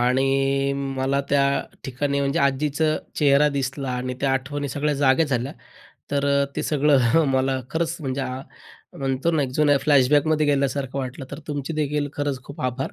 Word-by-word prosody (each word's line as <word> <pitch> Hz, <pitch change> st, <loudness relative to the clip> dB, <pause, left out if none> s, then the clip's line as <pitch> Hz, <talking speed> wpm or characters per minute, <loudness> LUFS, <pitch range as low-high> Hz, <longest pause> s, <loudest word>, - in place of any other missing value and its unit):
आणि 135 Hz, +2 st, +2 dB
मला 135 Hz, 0 st, -1 dB
त्या 140 Hz, -1 st, +3 dB, 0.4 s
ठिकाणी 140 Hz, +2 st, -1 dB
म्हणजे 140 Hz, 0 st, 0 dB
आजीचा 140 Hz, +3 st, +1 dB, 0.3 s
चेहरा 145 Hz, 0 st, +4 dB
दिसला 135 Hz, 0 st, -2 dB
आणि 125 Hz, 0 st, -3 dB
त्या 135 Hz, -1 st, +1 dB
आठवणी 140 Hz, +2 st, -2 dB
सगळ्या 145 Hz, +2 st, -1 dB
जाग्या 140 Hz, +3 st, +3 dB
झाल्या. 130 Hz, -1 st, -2 dB, 0.6 s
तर 140 Hz, 0 st, 0 dB, 0.3 s
ते -, -, -1 dB
सगळं 145 Hz, 0 st, +3 dB
मला 130 Hz, 0 st, +1 dB
खरंच 165 Hz, +1 st, -1 dB
म्हणजे 135 Hz, -2 st, -3 dB, 0.8 s
म्हणतो 135 Hz, +4 st, 0 dB
ना, 155 Hz, -3 st, +1 dB
एक 130 Hz, -, -2 dB
अ, -, -, -10 dB
जुन्या 145 Hz, -2 st, +4 dB
फ्लॅशबॅक 145 Hz, +1 st, +3 dB
मध्ये 155 Hz, -1 st, +2 dB
गेल्यासारखं 140 Hz, -1 st, 0 dB
वाटलं. 130 Hz, +1 st, -5 dB
तर 140 Hz, -, -6 dB
तुमचे 145 Hz, +1 st, -3 dB
देखील 150 Hz, -1 st, -1 dB
खरंच 140 Hz, -3 st, -2 dB
खूप 140 Hz, -, -10 dB
आभार 130 Hz, +3 st, -2 dB
140 Hz, 165 wpm, -23 LUFS, 135-145 Hz, 0.8 s, चेहरा